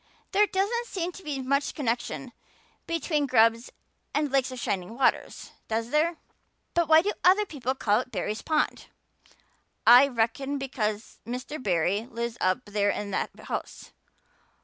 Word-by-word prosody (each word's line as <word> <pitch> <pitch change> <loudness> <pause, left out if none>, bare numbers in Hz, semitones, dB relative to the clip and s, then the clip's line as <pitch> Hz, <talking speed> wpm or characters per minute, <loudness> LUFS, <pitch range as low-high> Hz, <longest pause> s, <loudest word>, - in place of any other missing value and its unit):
There 415 +2 +4
doesn't 425 +5 -1
seem 360 -4 -3
to 385 - -12
be 280 -4 -4
much 280 +2 0
connection 250 -1 -3 0.5
between 310 -3 0
grubs 230 -1 +3 0.5
and 295 -1 +1
lakes 270 -1 +1
of 255 - -7
shining 195 0 -3
waters, 270 - 0 0.2
does 225 +2 -2
there? 320 +3 +2 0.6
But 340 -1 +2
why 320 +1 +6
do 415 - 0
other 385 +4 +5
people 265 - -3
call 210 -4 +2
it 250 - -6
Barry's 210 +1 -3
pond?" 310 -1 -1 1.0
"I 245 +4 +9
reckon 265 +3 -1
because 225 -6 -3
Mr. 250 +6 -6
Barry 195 +2 0
lives 235 -1 -4
up 185 +7 +1
there 205 0 0
in 205 0 -3
that - - -1
house. - - -6
260 Hz, 150 wpm, -27 LUFS, 225-305 Hz, 1.0 s, I